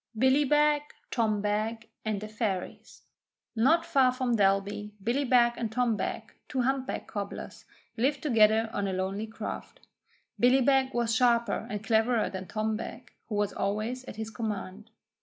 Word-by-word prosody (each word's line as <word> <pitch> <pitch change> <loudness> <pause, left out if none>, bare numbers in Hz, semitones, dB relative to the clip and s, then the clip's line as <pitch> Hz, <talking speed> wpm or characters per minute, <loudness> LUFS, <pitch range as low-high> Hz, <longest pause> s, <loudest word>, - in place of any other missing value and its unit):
BILLY 265 +5 +4
BEG, 295 +1 +3 0.3
TOM 215 -4 +1
BEG, 215 +2 -1 0.2
AND 215 -2 -2
THE 215 - -5
FAIRIES 210 -4 -4 0.5
Not 320 +9 +3
far 270 -6 +4
from 255 -2 0
Dalby, 205 +1 +1
Billy 260 +6 +1
Beg 240 -2 +4
and 225 -2 -3
Tom 240 -1 +1
Beg, - - -4 0.2
two 260 - 0
humpback 265 +1 -1
cobblers, 200 -2 -6 0.3
lived 270 +4 0
together 225 -4 +4
on 200 -1 -1
a 190 - -2
lonely 190 +3 -2
croft. 220 - -7 0.6
Billy 250 +2 +5
Beg 265 0 +3
was 235 -1 +1
sharper 235 -2 +2
and 210 0 -4
cleverer 220 -2 +2
than 190 -1 -6
Tom 215 +5 -1
Beg, 235 +2 -7 0.2
who 215 - -2
was 205 -1 0
always 220 +5 -2
at - - -8
his 220 0 -5
command. 210 -1 -5
225 Hz, 160 wpm, -29 LUFS, 210-255 Hz, 0.6 s, Billy